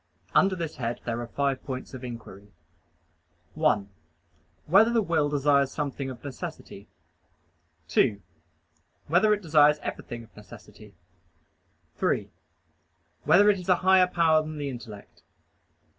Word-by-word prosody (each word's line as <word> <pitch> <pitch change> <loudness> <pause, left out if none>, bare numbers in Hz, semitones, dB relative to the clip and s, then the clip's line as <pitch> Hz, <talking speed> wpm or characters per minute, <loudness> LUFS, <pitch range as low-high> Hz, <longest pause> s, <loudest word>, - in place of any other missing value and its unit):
Under 195 0 +4
this 165 -3 -5
head 120 -1 -3
there 120 0 -3
are 120 - -6
five 140 +1 -2
points 130 0 -7
of 130 -1 -8
inquiry: 110 -5 -9 1.1
(1) 145 -11 +1 0.8
Whether 200 +8 +5
the 235 - +2
will 160 -5 +1
desires 140 -1 +2
something 140 -2 -4
of 125 -2 -10
necessity? 125 -6 -8 1.0
(2) 100 -2 +2 0.9
Whether 180 +7 +3
it 210 -1 0
desires 150 -2 +4
everything 120 -1 -6
of 110 - -20
necessity? 105 -1 -15 1.0
(3) - - -1 0.9
Whether 205 +2 +6
it 195 - -3
is 180 +1 -9
a 180 - +6
higher 190 -1 +6
power 165 -3 +3
than 155 0 -7
the 145 -1 -3
intellect? 115 -5 -11
145 Hz, 130 wpm, -26 LUFS, 120-170 Hz, 1.1 s, Whether